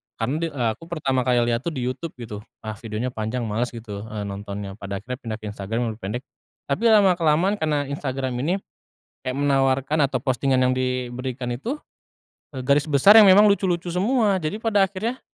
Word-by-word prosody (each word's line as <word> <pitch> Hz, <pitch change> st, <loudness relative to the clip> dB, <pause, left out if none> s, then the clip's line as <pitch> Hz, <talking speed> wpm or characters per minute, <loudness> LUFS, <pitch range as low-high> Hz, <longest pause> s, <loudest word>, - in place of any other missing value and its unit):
Karena 120 Hz, +5 st, -2 dB
di 165 Hz, -, 0 dB
eee, 125 Hz, -5 st, 0 dB
aku 165 Hz, -, -14 dB
pertama 135 Hz, -6 st, 0 dB
kali 125 Hz, -1 st, +4 dB
lihat 115 Hz, +2 st, -1 dB
tuh -, -, 0 dB
di -, -, -3 dB
YouTube 130 Hz, +6 st, -3 dB
gitu, 110 Hz, -3 st, -6 dB, 0.2 s
ah, 110 Hz, -1 st, -5 dB
videonya 115 Hz, 0 st, -3 dB
panjang, 110 Hz, +2 st, -3 dB
males 115 Hz, +3 st, -1 dB
gitu, 105 Hz, -3 st, -7 dB
eh, 105 Hz, -2 st, -5 dB
nontonnya. 100 Hz, 0 st, -6 dB
Pada 100 Hz, 0 st, -5 dB
akhirnya 125 Hz, +3 st, -4 dB
pindah 115 Hz, -5 st, -5 dB
ke -, -, -8 dB
Instagram, 115 Hz, +3 st, -2 dB
lebih -, -, -21 dB
pendek. 115 Hz, +7 st, -3 dB, 0.4 s
Tapi 140 Hz, +11 st, -1 dB
lama-kelamaan 180 Hz, -2 st, +4 dB
karena 150 Hz, -3 st, +1 dB
Instagram 135 Hz, -2 st, -3 dB
ini, 170 Hz, +5 st, +1 dB, 0.7 s
kayak 130 Hz, 0 st, -2 dB
menawarkan 135 Hz, +1 st, +2 dB
atau 130 Hz, -, -1 dB
postingan 130 Hz, 0 st, +1 dB
yang 125 Hz, -, +3 dB
diberikan 125 Hz, 0 st, -3 dB
itu, 225 Hz, -, -3 dB, 0.8 s
e -, -, -4 dB
garis 140 Hz, +3 st, +2 dB
besar 150 Hz, +8 st, +6 dB
yang 210 Hz, -, +8 dB
memang 205 Hz, +3 st, +8 dB
lucu-lucu 180 Hz, -3 st, 0 dB
semua, 205 Hz, +2 st, +2 dB
jadi 155 Hz, +5 st, -2 dB
pada 210 Hz, -3 st, +3 dB
akhirnya, 215 Hz, +7 st, -4 dB
130 Hz, 185 wpm, -23 LUFS, 115-165 Hz, 0.8 s, yang